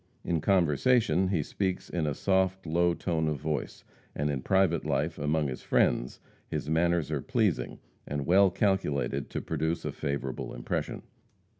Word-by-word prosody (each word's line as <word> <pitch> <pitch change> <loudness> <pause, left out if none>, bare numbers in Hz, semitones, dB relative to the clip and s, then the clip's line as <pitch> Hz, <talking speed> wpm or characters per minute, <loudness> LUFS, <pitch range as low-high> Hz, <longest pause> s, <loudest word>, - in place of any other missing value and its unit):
In 85 -3 0
conversation, 95 - +3
he 90 -6 0
speaks 95 +3 -2
in 85 -3 -2
a 75 - -1
soft, 95 0 +1
low 85 +2 +2
tone 80 -3 -1
of 75 -2 -1
voice, 75 +1 -3 0.3
and 75 +1 0
in 70 -2 -2
private 95 +1 +2
life, 80 +3 -1
among 75 +1 +1
his 65 -2 -5
friends, - - +1 0.3
his - - -4
manners 85 0 +1
are - - -1
pleasing, - - 0 0.3
and 70 -1 -3
well 95 +3 +5
calculated 80 - 0
to - - -3
produce 80 +1 -2
a - - -1
favorable 70 -2 -4
impression. - - -3
80 Hz, 155 wpm, -29 LUFS, 75-95 Hz, 0.3 s, well